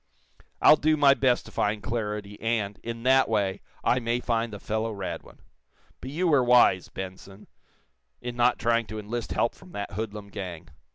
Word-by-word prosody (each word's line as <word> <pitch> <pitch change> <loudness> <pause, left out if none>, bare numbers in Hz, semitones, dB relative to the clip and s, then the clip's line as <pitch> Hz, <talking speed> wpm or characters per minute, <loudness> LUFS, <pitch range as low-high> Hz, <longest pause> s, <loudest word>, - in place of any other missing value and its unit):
I'll 155 - +8
do 155 +1 +2
my 140 -2 +6
best 130 -3 +1
to - - -12
find 105 0 -1
Claridy, 105 -3 -4
and, 110 -3 -1
in 115 0 -6
that 130 0 +4
way, 100 -3 0 0.2
I 125 - +3
may 120 0 -1
find 115 -2 -1
the 105 - -7
fellow, 110 +2 -2
Radwin. 100 -3 -7 0.6
But 130 - -7
you 170 +6 0
were 145 -6 +4
wise, 120 -7 +4
Benson, 95 +1 -9 0.7
in 120 -1 -6
not 120 0 +3
trying 115 0 +1
to 110 - -6
enlist 110 +2 -4
help - - +1
from 90 - -16
that 100 0 -5
hoodlum 105 0 -5
gang. 90 -5 -7
115 Hz, 175 wpm, -27 LUFS, 100-125 Hz, 0.7 s, I'll